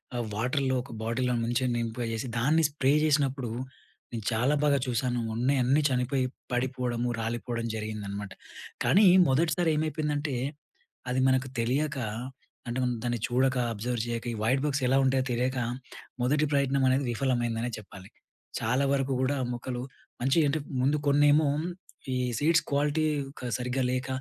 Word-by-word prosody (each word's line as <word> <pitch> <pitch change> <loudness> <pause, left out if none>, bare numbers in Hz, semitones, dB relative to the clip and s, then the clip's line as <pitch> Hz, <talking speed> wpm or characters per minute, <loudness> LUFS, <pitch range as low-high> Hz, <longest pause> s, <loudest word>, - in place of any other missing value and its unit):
ఆహ్, 120 -1 -1
వాటర్‍లో 130 +4 0
ఒక 135 - -12
బాటిల్‌లో 125 +2 0
ముంచి 120 +2 0
నింపేచేసి, 115 +1 -3
దాన్ని 155 +6 +3
స్ప్రే 140 -1 +2
చేసినప్పుడు 135 -5 +1 0.6
నేను 110 -3 -5
చాలా 125 +7 +2
బాగా 145 -1 +4
చూశాను, 125 0 0 0.2
ఉన్నాయి 130 +4 +2
అన్నీ 135 +5 +3
చనిపోయి 130 +1 0 0.3
పడిపోవడము, 125 -1 -1
రాలిపోవడం, 115 +1 -3
జరిగిందనమాట. 105 -2 -5 0.5
కానీ, 205 +4 +5 0.2
మొదటిసారి 160 +5 +2
ఏమైపోయిందంటే, 150 -1 -1 0.8
అది 125 +1 0
మనకు 130 0 +2
తెలియక, 140 +5 0 0.7
అంటే 120 - -3
మనం 125 -1 0
దాన్ని 120 -1 -1
చూడక, 130 +2 +2 0.2
అబ్జర్వ్ 120 +2 -2
చేయక, 115 0 -3
ఈ - - -4
వైట్ 130 +4 +2
బగ్స్ 140 -1 0
ఎలా 135 +2 +3
ఉంటాయో 130 0 +2
తెలియక, 125 +2 0 0.6
మొదటి 145 +5 +2
ప్రయత్నం 140 -1 +2
అనేది 135 +2 +2
విఫలమైందనే 120 -2 0
చెప్పాలి. 100 -2 -12 0.5
చాలా 125 +5 +1
వరకు 135 -1 0
కూడా 135 +2 +1 0.2
మొక్కలు, 120 +1 -4 0.4
మంచిగా 135 +5 +3
అంటే, 155 +3 0 0.2
ముందు 140 +4 +2
కొన్నేమో, 145 +1 +5 0.7
ఈ - - +1 0.2
సీడ్స్ 165 +3 +3
క్వాలిటీ 145 +2 +1 0.3
క 125 - -4
సరిగ్గా 125 +1 -1
లేక, 130 +1 -2
130 Hz, 140 wpm, -28 LUFS, 120-140 Hz, 0.8 s, కానీ